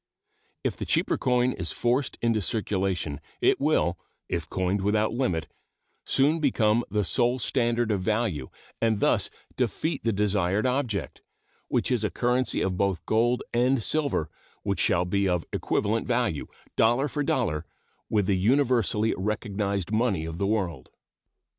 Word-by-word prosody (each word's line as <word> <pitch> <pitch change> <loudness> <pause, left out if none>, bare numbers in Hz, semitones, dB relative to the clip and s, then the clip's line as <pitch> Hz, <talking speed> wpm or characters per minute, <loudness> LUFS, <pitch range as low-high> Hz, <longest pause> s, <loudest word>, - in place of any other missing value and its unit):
If - - -1
the - - -4
cheaper - - +2
coin 125 0 +2
is 90 -8 -3
forced 125 +3 0
into 115 -2 +2
circulation, 95 -7 -1 0.2
it - - +3
will, 140 - +2 0.3
if - - -3
coined 95 +2 0
without 105 +2 +1
limit, 90 - 0 0.6
soon 150 +5 +3
become 120 -6 +2
the 105 -1 +1
sole 120 +6 +2
standard 120 -2 +1
of 100 -3 0
value, 100 - -1 0.3
and 110 -2 +2
thus - - +2 0.3
defeat 130 - -1
the 115 - +2
desired 100 0 +1
object, 125 -6 -1 0.5
which - - 0
is 120 -4 +1
a 105 - +1
currency 125 +1 +1
of 95 -1 -1
both 95 -5 0
gold 120 +3 +2
and 125 0 +2
silver 140 - 0 0.4
which - - -1
shall 90 +1 +2
be 100 +2 +1
of 90 -2 0
equivalent 110 +2 0
value, 120 - 0 0.3
dollar 120 +5 +3
for 145 +1 -3
dollar, 105 - 0 0.5
with 105 -3 +2
the 95 -1 +1
universally 115 -2 +2
recognized 100 -1 -2
money 110 -7 +1
of 80 +1 -6
the 100 - +1
world. 100 -6 -2
110 Hz, 145 wpm, -26 LUFS, 95-125 Hz, 0.6 s, it